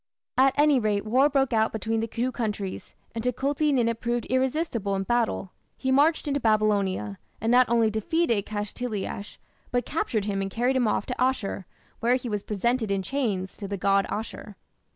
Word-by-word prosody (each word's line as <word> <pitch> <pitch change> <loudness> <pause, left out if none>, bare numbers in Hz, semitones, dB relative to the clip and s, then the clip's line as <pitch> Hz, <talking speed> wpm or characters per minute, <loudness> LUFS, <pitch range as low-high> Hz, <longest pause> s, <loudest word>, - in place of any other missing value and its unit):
At 265 +1 +4
any 295 -2 +5
rate 210 -2 0
war 260 +6 +4
broke 270 -3 +1
out 220 0 +3
between 225 +1 -1
the 225 - -1
two 245 +3 -2
countries, 210 -6 -4 0.2
and 225 -1 -4
Tukulti 280 +4 +1
Ninip 230 -4 +1
proved 240 0 -1
irresistible 260 - 0
in 195 - -1
battle. 230 -4 0 0.3
He 260 - -1
marched 300 +4 +3
into 285 0 0
Babylonia, 205 - +1 0.2
and 225 +2 0
not 250 0 +5
only 230 -2 +3
defeated 220 - 0
Kashtiliash, 210 -1 -4 0.3
but 245 0 0
captured 225 -9 -1
him 200 -2 -1
and 195 - -2
carried 245 +6 0
him 250 -3 +2
off 210 - 0
to 250 - -3
Asshur, 250 -7 0 0.3
where 240 +2 +3
he 250 -1 -3
was 210 -2 -1
presented 220 +3 0
in 195 -1 0
chains 200 -7 -2
to 200 - -6
the 200 0 -3
god 195 +1 +2
Ashur. 215 -1 -5
230 Hz, 180 wpm, -26 LUFS, 205-255 Hz, 0.3 s, any